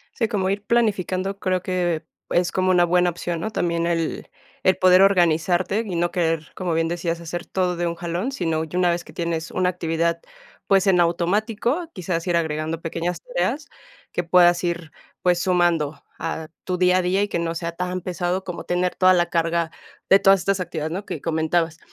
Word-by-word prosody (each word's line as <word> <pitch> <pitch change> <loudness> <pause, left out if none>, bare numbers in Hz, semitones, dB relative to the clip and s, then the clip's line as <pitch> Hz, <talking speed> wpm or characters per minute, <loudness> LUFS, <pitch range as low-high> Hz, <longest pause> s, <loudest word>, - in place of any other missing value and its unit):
Sí, 230 -3 0
como 195 -4 0
ir 200 +1 -2
planificando, 195 -4 0
creo 185 -2 0
que 175 -3 -1 0.3
es 175 0 +1
como 185 0 +1
una 175 -1 +5
buena 180 +1 +3
opción, 170 0 -4
¿no? 220 - -3
También 170 -4 -1
el 165 -2 -2 0.4
el 185 - +4
poder 185 0 +6
organizarte 180 +2 +2
y 185 - -4
no 170 0 +1
querer, 165 -3 -1
como 175 -3 -1
bien 165 0 +1
decías, 170 0 -2
hacer 170 +2 -6
todo 180 -2 -1
de 175 0 -1
un 170 - -1
jalón, 175 +9 -3
sino 165 -8 -1
ya 160 +2 -7
una 180 -1 +3
vez 175 0 -2
que - - -14
tienes 165 -1 -3
una 185 0 +1
actividad, 170 -1 -1 0.5
pues, 195 0 +3
en 185 -2 +4
automático, 215 - 0
quizás 175 -2 -3
ir 175 -2 +1
agregando 160 0 -2
pequeñas 170 +2 -3
tareas, - - -2 0.4
que 175 - -2
puedas 175 0 +5
ir, 170 -2 -2 0.3
pues, 180 -1 +3
sumando 170 -5 +1 0.2
a 160 -1 -4 0.2
tu 185 - -1
día, 180 0 +3
a - - +1
día 185 +3 +1
y 205 - 0
que - - -2
no 170 0 -2
sea 170 0 -4
tan 180 +1 -2
pesado 180 +1 -2
como 180 -2 -6
tener 180 +1 -1
toda 185 0 +5
la 175 -1 +1
carga 165 -1 0 0.4
de 195 - +8
todas 195 -1 +5
estas 195 +2 0
actividades, 165 -3 -4
¿no? 195 +3 -5
Que - - -5
comentabas, 165 0 0
175 Hz, 195 wpm, -23 LUFS, 170-185 Hz, 0.5 s, de